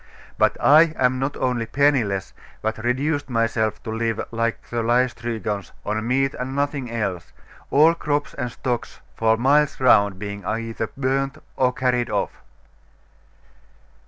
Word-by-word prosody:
But - - +3
I 155 +2 +6
am 130 0 +2
not 135 +2 -2
only 125 -3 -1
penniless, 120 -8 +1 0.3
but 110 +1 -2
reduced 140 +4 0
myself 115 -2 0
to 110 - -5
live, 115 0 -1
like 115 0 -2
the 120 -1 0
Laestrygons, 115 -4 -1
on 110 +2 -2
meat 135 +2 +1
and 130 +1 -5
nothing 140 -3 -1
else; 105 -7 -3 0.4
all 155 +4 +5
crops 145 -3 -2
and 125 - -4
stocks 120 +1 -4 0.2
for 110 0 +2
miles 145 +5 +3
round 100 -7 +4
being 100 0 -6
either 115 +2 -3
burnt 135 0 0 0.2
or 125 -1 +2
carried 125 -1 0
off. - - -1
120 Hz, 135 wpm, -23 LUFS, 110-135 Hz, 0.4 s, I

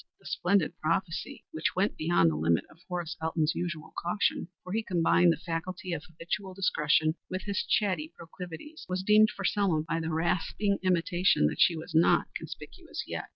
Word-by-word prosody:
The - - -25
splendid 180 -3 +1
prophecy, 170 +2 -2
which 155 - -1
went 190 +3 +1
beyond 160 - +3
the - - -3
limit 80 +2 +1
of - - -19
Horace 175 -2 -3
Elton's 160 0 +1
usual 170 -3 -4
caution 175 0 0 0.2
for 185 - -6
he 225 - +1
combined 175 -3 +3
the - - 0
faculty 180 +2 -4
of 155 -2 -4
habitual 180 +3 -5
discretion 155 -4 +2 0.2
with 185 0 -3
his 200 -1 -1
chatty 180 -7 0
proclivities 180 - -9
was 185 +1 -1
dimmed 215 +2 +6
for 195 - -6
Selma 185 -7 +2
by 165 +1 -2
the 165 0 -3
rasping 180 +5 0
intimation 180 - +3
that 75 - 0
she 170 - +6
was 160 +1 -8
not 160 +1 +4
conspicuous - - -7
yet. - - -5
175 Hz, 175 wpm, -29 LUFS, 160-190 Hz, 0.2 s, dimmed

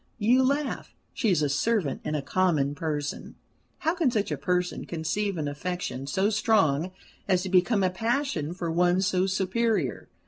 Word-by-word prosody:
You 235 +4 +4
laugh. 280 +2 -1 0.2
She 225 - 0
is 170 -5 +2
a - - +3
servant, 150 - 0
and 155 - -2
a 145 - -2
common 155 -5 +1
person. 145 -1 -4 0.4
How 320 +2 0
can 340 -6 +2
such 215 -4 -1
a - - +1
person 180 -1 -1
conceive 180 +4 -2
an 150 -2 -2
affection 145 -3 -4
so 190 +9 +1
strong 190 -7 +2 0.4
as 185 -2 +2
to 190 - -4
become 190 +3 +3
a 185 - +2
passion 225 - -1
for 170 -3 -3
one 175 +2 +3
so 185 0 +1
superior? 190 - 0
185 Hz, 170 wpm, -27 LUFS, 155-215 Hz, 0.4 s, You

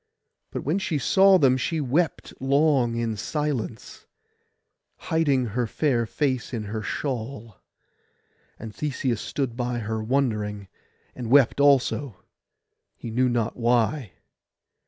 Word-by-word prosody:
But - - -5
when 160 +8 0
she 175 -5 -1
saw 190 +7 +5
them 130 -6 +4
she 160 +6 -1
wept 150 +4 -1
long 135 -3 +2
in 115 -1 -1
silence, 130 -1 -4 0.9
hiding 145 -6 +1
her 120 0 0
fair 120 -2 0
face 130 -1 -1
in 110 - -3
her 105 +1 -4
shawl; 115 -4 -5 1.0
and 110 -2 -8
Theseus 130 -4 -2
stood 130 -5 -3
by 120 0 -2
her 110 -1 -3
wondering, 105 -5 -1 0.4
and 120 -3 -6
wept 140 0 +5
also, 140 -4 +2 0.7
he 115 - -7
knew 125 +2 +2
not 120 -2 -1
why. 120 +1 +1
125 Hz, 120 wpm, -25 LUFS, 115-145 Hz, 1.0 s, saw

